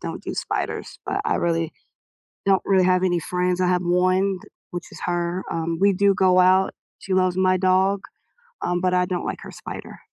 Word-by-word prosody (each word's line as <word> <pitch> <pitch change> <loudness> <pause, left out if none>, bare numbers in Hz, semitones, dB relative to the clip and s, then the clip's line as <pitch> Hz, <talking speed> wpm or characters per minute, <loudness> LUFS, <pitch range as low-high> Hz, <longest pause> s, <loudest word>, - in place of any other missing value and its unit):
don't - - -6
do - - -5
spiders, - - -3
but 395 - -1
I 445 - +1
really 165 -1 0 0.7
don't 195 -1 +4
really 190 -2 +4
have 185 0 +3
any 175 -2 +1
friends, 180 +2 -1
I 180 - +2
have 180 0 +2
1 185 +2 +2
t 210 - -16 0.2
which 175 0 -6
is - - -11
her, 175 +1 -1
um, 165 0 -2
we 200 +1 +5
do 200 +1 +3
go 185 -1 +4
out, 185 +1 +4 0.2
she 190 - -3
loves 185 -1 +2
my 185 0 +3
dog, 190 +2 +2 0.6
um, 175 0 0
but 185 0 +1
I 180 0 +3
don't 180 -1 -3
like - - -4
her - - -9
spider. - - -9
185 Hz, 200 wpm, -23 LUFS, 180-190 Hz, 0.7 s, we